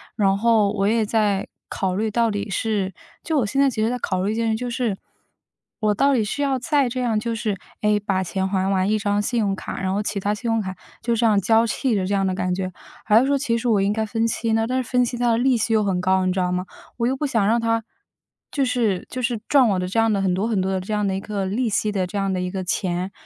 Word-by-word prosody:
然 195 -3 +3
后 220 -2 +3
我 200 -1 0
也 220 0 +2
在 205 -3 +1 0.2
考 185 -1 -2
虑 215 +3 0
到 230 +1 +2
底 205 0 -3
是 195 -1 -1 0.3
就 320 -3 0
我 245 - +1
现 260 +7 -1
在 280 - +5
其 220 -4 -3
实 220 - +2
在 250 - -1
考 185 -4 -1
虑 205 - 0
一 - - -3
件 230 0 0
事， 220 - +1
就 245 +2 -4
是， 235 -5 -1 0.8
我 215 -2 +2
到 275 +5 +3
底 235 -4 +2
是 210 +8 -3
要 270 -2 +1
再 285 -1 +2
这 255 +1 -3
样 230 -3 +1
就 230 +2 -3
是 215 -3 -2 0.2
诶， 210 0 +3
把 195 -2 -1
钱 190 +1 -2
还 190 0 0
完 190 -1 +1
一 215 0 +2
张 205 0 0
信 235 +3 -1
用 200 -3 +1
卡， - - -6
然 185 - -1
后 205 - -1
其 205 - -2
它 200 +2 -1
信 230 +3 -4
用 225 -1 +1
卡 190 -2 -5 0.3
就 235 0 0
这 230 +1 +1
样 210 -3 +4
交 225 +4 +4
替 235 +1 0
的 190 -2 0
这 200 - -1
样 195 -1 +1
的 185 - -1
感 180 -1 -1
觉， 185 0 -3 0.3
还 215 0 +6
是 255 - +2
说 280 - +2
其 240 -4 0
实 235 - -3
我 210 -4 +3
应 200 - +2
该 220 0 -1
分 225 +1 0
期 230 0 -1
呢。 225 0 +2
但 255 +1 0
是 - - -13
分 250 -1 +4
期 245 0 -2
它 240 -1 +2
的 225 - +2
利 255 0 +3
息 225 0 0
又 215 -1 +3
很 190 -3 0
高， 185 0 +2
你 185 - +2
知 190 - -1
道 180 -1 0
吗？ 180 0 -1 0.3
我 235 -1 +1
又 260 - +1
不 295 - -2
想 225 -7 +1
让 230 +2 +3
它， 230 0 0 0.7
就 280 - 0
是 230 -7 0
就 255 - -4
是 235 -2 0
赚 275 -4 +5
我 190 -2 +1
的 180 - -2
这 225 +5 0
样 225 0 +3
的 200 - 0
很 190 -2 +1
多 200 +4 0
很 215 -5 +1
多 190 +1 -1
的 190 - 0
这 210 +3 -5
样 210 -1 +1
的 190 - -1
一 - - -2
个 200 -1 -3
利 225 +6 -1
息 215 0 0
的 190 -3 0
这 180 - -10
样 195 -1 0
的 185 - -1
一 180 - -2
个 190 -1 -3
钱， 180 0 -2
215 Hz, 315 characters per minute, -22 LUFS, 195-235 Hz, 0.8 s, 还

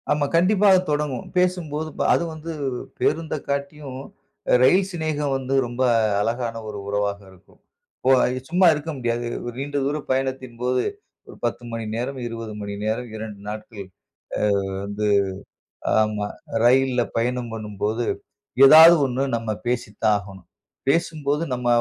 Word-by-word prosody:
ஆமா 145 -1 +2
கண்டிப்பா 195 +4 +4
அது 185 - +6
தொடங்கும். 145 -4 -1
பேசும்போது 165 -4 0
பா - - 0
அதும் 170 -1 0
வந்து 160 +1 -7 0.5
பேருந்த 160 -1 0
காட்டியும், 140 -1 -4 0.6
ரயில் 185 +9 +4
சிநேகம் 155 -4 -1
வந்து 135 0 -3
ரொம்ப 120 +2 -5 0.4
அழகான 115 +1 -2
ஒரு 105 -1 -6
உறவாக 100 0 -1
இருக்கும். 95 +1 -22 0.5
ஓ - - +6 0.4
சும்மா 180 +2 +4
இருக்க 155 +2 -4
முடியாது. 120 -1 -1 0.3
நீண்ட 145 +2 -3
தூர 145 +2 0
பயணத்தின் 130 -2 -2
போது 125 0 +1 0.4
ஒரு - - -12
10 120 +1 -2
மணி 115 0 -4
நேரம், 130 +4 -3
20 115 -2 -6
மணி 100 0 -5
நேரம் 115 +3 -2
2 110 -2 -7
நாட்கள் 105 -1 -7 0.8
ஆ - - -4 0.2
வந்து 105 +1 -2 1.0
ஆமா 105 -1 -1 0.4
ரயில்ல 130 0 +4 0.2
பயணம் 120 +1 -1
பண்ணும்போது, 110 +1 -3 0.6
ஏதாது 160 +4 +10
ஒண்ணு 130 +1 -2
நம்ம 115 -1 -4 0.2
பேசித்தான் 110 -3 0
ஆகணும். 95 -2 -12 0.4
பேசும்போது 150 -1 0
நம்ம 125 -1 -3
125 Hz, 130 wpm, -23 LUFS, 110-150 Hz, 1.0 s, ஏதாது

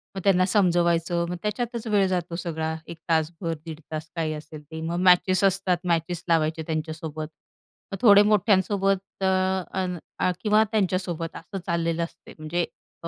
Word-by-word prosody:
मग 190 - -4
त्यांना 185 -2 +4
समजवायचं, 175 -3 +2
मग 180 - -2
त्याच्यातच 235 +2 -2
वेळ 205 -2 +3
जातो 175 -2 -2
सगळा, 160 -2 -3
एक 170 - -8
तासभर 165 +1 0
दीड 160 -1 -7
तास 155 +1 -5
काही 160 -2 -1
असेल 150 0 -9
ते. 160 +2 -8
मग 170 +2 -2
मॅचेस 185 +1 +5
असतात, 195 -2 +2
मॅचेस 170 +1 0
लावायचे 160 0 +2
त्यांच्यासोबत. 155 -1 -4 0.6
मग 195 - -3
थोडे 205 -3 +8
मोठ्यांसोबत 195 -1 +1
अ, - - +3 0.5
अन् 180 -1 -2 0.2
अ, 185 - +2
किंवा 215 0 +4
त्यांच्यासोबत 185 -5 -1
असं 195 - -7
चाललेलं 170 -1 0
असतं 165 - -9
म्हणजे 165 +3 -1 0.4
अ, - - -3
175 Hz, 155 wpm, -25 LUFS, 160-195 Hz, 0.6 s, थोडे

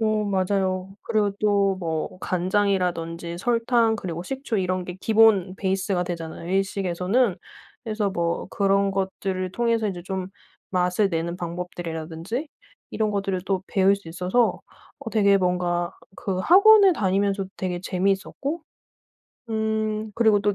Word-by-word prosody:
어 215 -1 +1
맞아요. 190 -1 0
그리고 215 -3 +1
또 200 -2 +2
뭐 165 +1 -3
간장이라든지 180 -3 -1
설탕 230 0 +2
그리고 170 -5 -5
식초 265 +2 -3
이런 185 -1 -1
게 180 0 -7
기본 215 -4 +4
베이스가 190 -2 0
되잖아요 165 -1 -6
일식에서는. 195 +2 +1 0.5
그래서 215 -3 -1
뭐 170 -2 -1
그런 195 0 +2
것들을 190 -1 -2
통해서 230 -2 +1
이제 175 -3 -5
좀 190 0 -4 0.4
맛을 180 +2 +2
내는 170 +1 -2
방법들이라든지 175 - -5 0.4
이런 215 -1 0
것들을 195 -2 -1
또 190 -2 0
배울 195 0 +3
수 200 -4 -12
있어서 185 +8 +1 0.4
어 225 - -7
되게 200 -2 +4
뭔가 175 -1 0 0.2
그 195 -5 -3
학원을 400 - +7
다니면서도 195 -2 0
되게 180 -2 -3
재미있었고 195 - -1 0.9
음. 220 -1 -1
그리고 220 -3 +4
또 205 0 +1
195 Hz, 305 characters per minute, -24 LUFS, 180-215 Hz, 0.9 s, 학원을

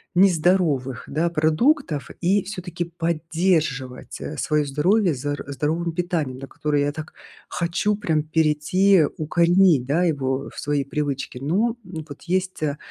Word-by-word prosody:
нездоровых, 165 - +2
да, 160 +4 0
продуктов 160 - +1
и 190 +3 +2
всё-таки 180 -3 -5
поддерживать, 165 -5 -1
э, - - -5
свое 150 -1 +1
здоровье 170 +5 +2
зар 145 +3 -3
здоровым 160 +4 -1
питанием, 165 -7 -2
на 135 - -7
которое 145 -1 -1
я 145 - 0
так 155 +1 -8 0.4
хочу 180 +5 0
прям 160 -7 0
перейти, 160 +4 +3
укоренить, 170 -2 +3
да, 165 +6 +2
его 135 -5 -1
в - - -8
свои 145 -1 0
привычки. 140 -2 -3
Но 215 - +1
вот 160 -5 -9
есть, 185 -1 -1
а, 150 -1 -1
160 Hz, 135 wpm, -23 LUFS, 145-180 Hz, 0.4 s, перейти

